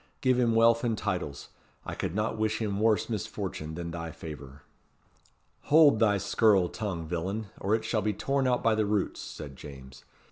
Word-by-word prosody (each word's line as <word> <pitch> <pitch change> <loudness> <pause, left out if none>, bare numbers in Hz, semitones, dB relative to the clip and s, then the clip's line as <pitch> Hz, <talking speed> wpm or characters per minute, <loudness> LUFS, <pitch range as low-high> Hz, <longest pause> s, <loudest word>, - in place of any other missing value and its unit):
Give 130 -2 +3
him 115 -2 +2
wealth 115 +1 +4
and 115 -3 0
titles. 70 -6 -3 0.4
I - - -5
could 85 - -3
not 105 +1 0
wish 110 0 -1
him 100 -3 -2
worse 110 -1 +2
misfortune 80 -7 -4
than 85 0 -5
thy 85 0 -5
favour." 70 -4 -10 1.0
"Hold 145 -6 +6
thy 105 -3 +4
scurril 100 -1 +3
tongue, 95 -7 -4
villain, 95 +6 -3
or 100 +3 +1
it 110 - -3
shall 110 - 0
be 105 +1 0
torn 135 +6 0
out 125 -1 +1
by 115 - +4
the 110 -1 +1
roots," 105 -2 -1
said 70 -2 -8
James. 65 -2 -11
105 Hz, 180 wpm, -28 LUFS, 85-115 Hz, 1.0 s, Hold